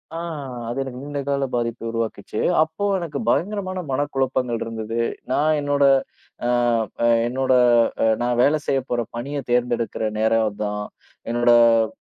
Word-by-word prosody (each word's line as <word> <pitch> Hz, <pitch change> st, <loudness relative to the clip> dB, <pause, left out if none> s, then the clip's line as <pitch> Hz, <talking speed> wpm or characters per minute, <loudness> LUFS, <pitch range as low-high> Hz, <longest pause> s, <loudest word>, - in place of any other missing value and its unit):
ஆ, -, -, -3 dB, 0.5 s
அது 120 Hz, -, -4 dB
எனக்கு 130 Hz, -1 st, -8 dB
நீண்ட 145 Hz, 0 st, -4 dB
கால 140 Hz, -1 st, 0 dB
பாதிப்ப 115 Hz, -1 st, -2 dB
உருவாக்குச்சு. 115 Hz, -1 st, -4 dB, 0.2 s
அப்போ 160 Hz, +6 st, -1 dB
எனக்கு 170 Hz, -4 st, -5 dB
பயங்கரமான 190 Hz, -1 st, -1 dB
மனக்குழப்பங்கள் 130 Hz, -3 st, -1 dB
இருந்தது. 115 Hz, 0 st, -4 dB, 0.3 s
நான் 155 Hz, +1 st, +2 dB
என்னோட 145 Hz, 0 st, +1 dB, 0.6 s
ஆ, -, -, +1 dB, 0.5 s
ஆ, -, -, +4 dB, 0.2 s
என்னோட 130 Hz, +1 st, 0 dB, 0.5 s
அ, -, -, +3 dB, 0.2 s
நான் 120 Hz, 0 st, 0 dB
வேலை 145 Hz, +4 st, +4 dB
செய்யப்போற 130 Hz, -3 st, 0 dB
பணிய 140 Hz, +5 st, -4 dB
தேர்ந்தெடுக்கிற 120 Hz, -2 st, 0 dB, 0.2 s
நேரம் 110 Hz, 0 st, +3 dB
அதுதான். 105 Hz, 0 st, -3 dB, 0.5 s
என்னோட 120 Hz, 0 st, +3 dB, 0.3 s
அ, -, -, -2 dB
125 Hz, 135 wpm, -22 LUFS, 115-145 Hz, 0.6 s, ஆ